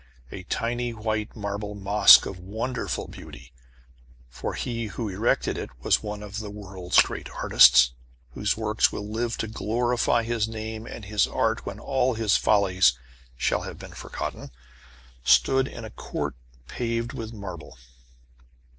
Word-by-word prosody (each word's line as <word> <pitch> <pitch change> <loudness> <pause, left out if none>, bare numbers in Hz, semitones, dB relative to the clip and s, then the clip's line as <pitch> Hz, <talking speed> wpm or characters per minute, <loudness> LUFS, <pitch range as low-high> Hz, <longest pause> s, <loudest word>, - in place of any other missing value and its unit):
A 95 - -7
tiny 120 +5 -2
white 110 -1 -3
marble 105 -1 -4
mosque 100 +1 +7
of 95 - -6
wonderful 105 - -4
beauty - - -12 0.8
for 60 +1 -5
he 115 -2 -3
who 110 +3 -4
erected 100 +5 0
it - - -5
was - - +3
one 105 -1 -6
of 105 +1 -6
the 105 -2 -6
world's 95 -3 0
great - - -7
artists, 60 -1 +6 0.4
whose 105 +11 -1
works 110 -1 +2
will 105 - -5
live 115 +2 -2
to 110 - -2
glorify 120 +2 0
his 115 -2 -1
name 110 0 -6
and 105 - -8
his 105 +1 +1
art - - -1
when - - -5
all 130 -2 0
his 110 -2 +2
follies 95 -8 +4 0.4
shall - - +1
have - - -7
been - - -11
forgotten - - -6 0.7
stood 65 - +4
in 115 - -8
a 110 - -9
court - - -4 0.3
paved 115 +1 -3
with 115 -4 -6
marble. 95 - -9
105 Hz, 145 wpm, -25 LUFS, 100-115 Hz, 0.8 s, mosque